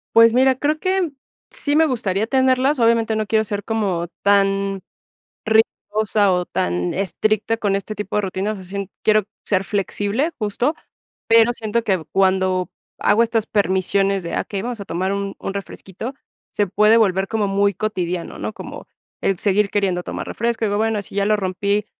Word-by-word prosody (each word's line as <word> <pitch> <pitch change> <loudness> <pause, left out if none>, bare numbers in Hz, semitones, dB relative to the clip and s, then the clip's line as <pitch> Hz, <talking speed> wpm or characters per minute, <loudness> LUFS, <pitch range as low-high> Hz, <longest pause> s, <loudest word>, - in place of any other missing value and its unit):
Pues, 230 0 +7
mira, 260 +1 +4
creo 295 +4 0
que 370 -3 0 0.4
sí 290 0 0
me 320 +1 +5
gustaría 220 -6 -1
tenerlas, 260 +2 +2
obviamente 230 -1 +3
no 215 -1 -1
quiero 220 -1 +2
ser 205 -1 -4
como 195 -6 -1
tan 195 -1 +2 0.6
rigurosa 215 -2 +2
o 180 -1 +1
tan 90 0 -1
estricta 215 +3 0
con 205 -3 0
este 200 +2 -4
tipo 210 - -5
de 210 - +3
rutina, 190 +2 -2
o - - -6
sea, 190 - -10
sien 195 +1 -5
quiero 215 -1 +4 0.2
ser 195 -2 +1
flexible 205 - -1
justo, 240 +7 -1 0.5
pero, 230 +1 +6
siento 225 0 -1
que 190 -6 0
cuando 185 -2 +2 0.3
hago 220 +3 +4
estas 225 -2 0
permisiones 195 -1 +1
de: 170 - -4
"Ah, - - +1
okey, 200 -2 -5
vamos 240 +1 -4
a 200 - -6
tomar 185 +3 -2
un 200 0 -3
un 195 - -4
refresquito", 200 +4 -7 0.4
se 205 - 0
puede 210 +4 +4
volver 195 -3 +2
como 215 -2 0
muy 200 +1 +2
cotidiano, 180 -4 -3
¿no?, - - -4
como - - -9 0.3
el 195 -2 0
seguir 205 0 +2
queriendo 190 -4 0
tomar - - -5
refresco, 230 0 -1
digo: 205 0 0
"Bueno, 220 -1 0
si 200 - -11
ya 200 - +1
lo 215 +1 +3
rompí, 200 +2 -1
205 Hz, 175 wpm, -21 LUFS, 195-225 Hz, 0.6 s, Pues